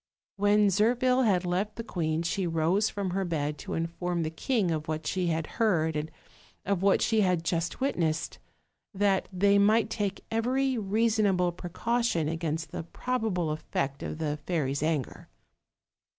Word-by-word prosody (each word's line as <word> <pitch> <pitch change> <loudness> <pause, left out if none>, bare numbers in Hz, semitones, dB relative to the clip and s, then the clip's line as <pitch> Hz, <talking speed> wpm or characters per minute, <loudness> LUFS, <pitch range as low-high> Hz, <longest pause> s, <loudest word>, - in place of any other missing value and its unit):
When 205 +1 +4
Zirphil 245 +5 +3
had 185 -3 +2
left 190 +4 -1
the 230 - -5
queen 165 -6 -1
she 180 +2 -1
rose 170 +6 +2
from 200 -3 -3
her 195 +2 0
bed 150 -4 -2
to - - -5
inform 170 +1 -2
the 155 - -3
king 200 +2 0
of 155 -1 -2
what 155 0 -3
she 185 -2 0
had 160 -1 0 0.2
heard 160 -8 +2
and 150 +1 -2 0.6
of 195 -2 0
what 195 0 +3
she 220 -2 +3
had 180 -4 +2
just 170 0 -1
witnessed, 165 - -1 0.6
that 195 -1 +1
they 200 +2 +3
might 215 +2 +3
take 205 -3 -3
every 255 +4 +1
reasonable 205 -4 +2
precaution 180 +1 -1
against 160 0 -3
the - - -4
probable 190 -3 -2
effect 140 -2 -3
of - - -4
the 150 -2 -2
fairy's 140 -6 0
anger. 155 -4 -2
180 Hz, 155 wpm, -28 LUFS, 160-210 Hz, 0.6 s, When